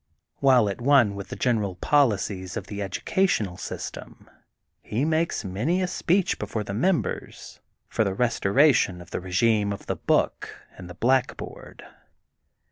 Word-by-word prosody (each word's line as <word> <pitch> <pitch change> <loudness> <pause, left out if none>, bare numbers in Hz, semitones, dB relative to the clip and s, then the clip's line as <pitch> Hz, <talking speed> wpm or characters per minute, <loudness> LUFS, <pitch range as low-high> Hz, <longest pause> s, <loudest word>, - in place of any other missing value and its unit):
While 130 -5 +4
at 100 +3 -4
one 125 -5 +4
with 100 -1 -7
the - - -7
general 105 -7 0
poli 135 +4 +3
cies 95 0 -5
of 100 - -5
the 100 0 -6
educational 100 - 0
system, - - -8 0.5
he 120 +7 -2
makes 160 -6 0
many 115 - -1
a 185 - +1
speech 180 +1 0
before 105 +1 -3
the 100 - -6
members 170 - -2 0.3
for - - 0
the 95 -2 -2
restora 125 +5 +3
tion 90 -6 0
of 90 +1 -13
the - - -2
regime 100 +3 +1
of 100 - -6
the - - -2
book - - 0 0.2
and 90 -1 -10
the 90 - -9
black 130 +3 +1
board. - - -10
110 Hz, 160 wpm, -25 LUFS, 100-135 Hz, 0.5 s, While